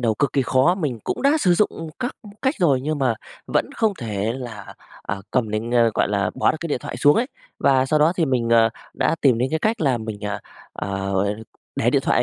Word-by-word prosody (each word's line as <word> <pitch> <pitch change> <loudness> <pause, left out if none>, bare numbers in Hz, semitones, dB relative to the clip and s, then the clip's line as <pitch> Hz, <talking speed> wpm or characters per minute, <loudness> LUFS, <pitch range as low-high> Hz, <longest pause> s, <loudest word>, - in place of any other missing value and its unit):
đầu 115 -3 +1
cực 140 +6 0
kỳ 135 - +2
khó, 130 +8 +3
mình 145 - -2
cũng - - -3
đã 285 +3 +4
sử 180 -3 +4
dụng 165 -4 0
các 250 0 -3 0.3
cách 265 +3 +2
rồi 145 -9 +3
nhưng 150 +2 -2
mà 130 -4 +2 0.3
vẫn - - 0
không 220 -2 +1
thể 110 -1 -2
là, 115 -6 -8 0.3
à, 100 - -3
cầm 115 -4 0
đến, 110 +2 -2
a, 115 -1 +5
gọi - - +2
là, 100 -2 0
bỏ - - +3
được - - -2
cái 170 - -4
điện 145 - 0
thoại - - -6
xuống 145 +4 +5
ấy. 240 - +2 0.3
Và 135 -1 +3
sau 155 +2 +2
đó 155 +3 +4
thì 165 - +2
mình, 125 -4 0
ờ, 115 -1 +5 0.3
đã - - +1
tìm 130 -5 +4
đến 130 +2 0
cái 160 - 0
cách 220 +6 0
là 135 -6 +2
mình, 110 -2 -6
à, 105 -1 -3 0.3
à, - - -5 0.9
để - - +2
điện - - +2
thoại - - +3
130 Hz, 240 wpm, -22 LUFS, 115-160 Hz, 0.9 s, a